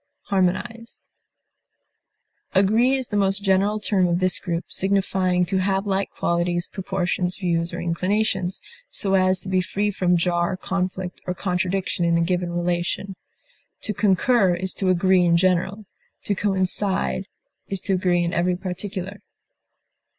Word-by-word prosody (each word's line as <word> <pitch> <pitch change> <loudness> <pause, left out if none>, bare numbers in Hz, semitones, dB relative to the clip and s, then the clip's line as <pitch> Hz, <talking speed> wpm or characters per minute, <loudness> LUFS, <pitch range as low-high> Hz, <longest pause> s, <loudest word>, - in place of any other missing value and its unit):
acquiesce, 215 +5 -1 1.5
Agree 220 +7 +4
is 260 -2 -3
the 205 - -3
most 195 0 +1
general 200 +2 +2
term 195 -3 +2
of 170 0 +1
this 185 -1 +2
group, 170 -2 -3
signifying 190 -2 +1
to 190 +2 0
have 195 +1 0
like 195 -1 0
qualities, 175 0 -1
proportions, 185 -2 -2
views, 170 -3 -1
or - - -5
inclinations, 185 +2 -1 0.3
so 195 -1 -1
as 185 -1 +3
to 185 - -12
be 185 -1 +2
free 205 +3 -1
from 180 -2 +2
jar, 175 +2 0
conflict, 185 -1 -3
or 180 - -1
contradiction 185 -1 -1
in 170 0 +3
a - - +2
given 175 0 0
relation. 175 +2 -2 0.7
To 210 - 0
concur 195 0 +3
is 185 +1 -2
to 190 - -1
agree 185 0 +4
in 170 -1 +4
general; 185 +3 +1 0.4
to 205 - 0
coincide 195 0 0 0.4
is 195 - -2
to 195 - -1
agree 180 -1 +2
in 170 - -2
every 180 +1 +1
particular. 190 +2 -5
185 Hz, 145 wpm, -23 LUFS, 180-195 Hz, 1.5 s, Agree